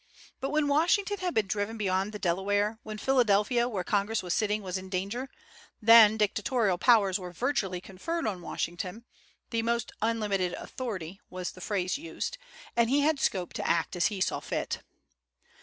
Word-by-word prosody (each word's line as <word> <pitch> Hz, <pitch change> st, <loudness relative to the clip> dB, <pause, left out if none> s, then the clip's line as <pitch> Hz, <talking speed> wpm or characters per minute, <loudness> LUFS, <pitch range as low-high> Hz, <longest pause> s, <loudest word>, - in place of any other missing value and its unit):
But 270 Hz, -, -2 dB
when 300 Hz, 0 st, +1 dB
Washington 360 Hz, +8 st, +2 dB
had 360 Hz, -1 st, -2 dB
been 220 Hz, -, +3 dB
driven 205 Hz, +3 st, -2 dB
beyond 195 Hz, -1 st, 0 dB
the 210 Hz, -, -5 dB
Delaware, 205 Hz, +3 st, 0 dB
when 215 Hz, 0 st, -7 dB
Philadelphia, 240 Hz, 0 st, +3 dB
where 195 Hz, -6 st, -2 dB
Congress 205 Hz, +3 st, 0 dB
was 180 Hz, -1 st, -1 dB
sitting, 210 Hz, -1 st, 0 dB
was 185 Hz, -1 st, -4 dB
in 190 Hz, 0 st, -5 dB
danger, 200 Hz, +8 st, -3 dB, 0.5 s
then 220 Hz, -1 st, +8 dB
dictatorial 210 Hz, -1 st, +1 dB
powers 205 Hz, -6 st, +4 dB
were 180 Hz, -1 st, -7 dB
virtually 195 Hz, -, -1 dB
conferred 195 Hz, -, -4 dB
on 190 Hz, -5 st, -2 dB
Washington, 180 Hz, +6 st, -4 dB, 0.5 s
"the 230 Hz, -1 st, +1 dB
most 235 Hz, 0 st, -1 dB
unlimited 210 Hz, -5 st, 0 dB
authority" 195 Hz, -8 st, -6 dB
was 180 Hz, -1 st, -4 dB
the 185 Hz, -, -13 dB
phrase 190 Hz, +4 st, -1 dB
used, 335 Hz, +9 st, -5 dB, 0.4 s
and 235 Hz, -1 st, +3 dB
he 280 Hz, +3 st, +3 dB
had 300 Hz, 0 st, +2 dB
scope 185 Hz, -9 st, -1 dB
to -, -, -3 dB
act 165 Hz, 0 st, +1 dB
as 170 Hz, -3 st, +3 dB
he 205 Hz, -, -4 dB
saw 185 Hz, -, 0 dB
fit. -, -, -3 dB
210 Hz, 170 wpm, -29 LUFS, 185-240 Hz, 0.5 s, then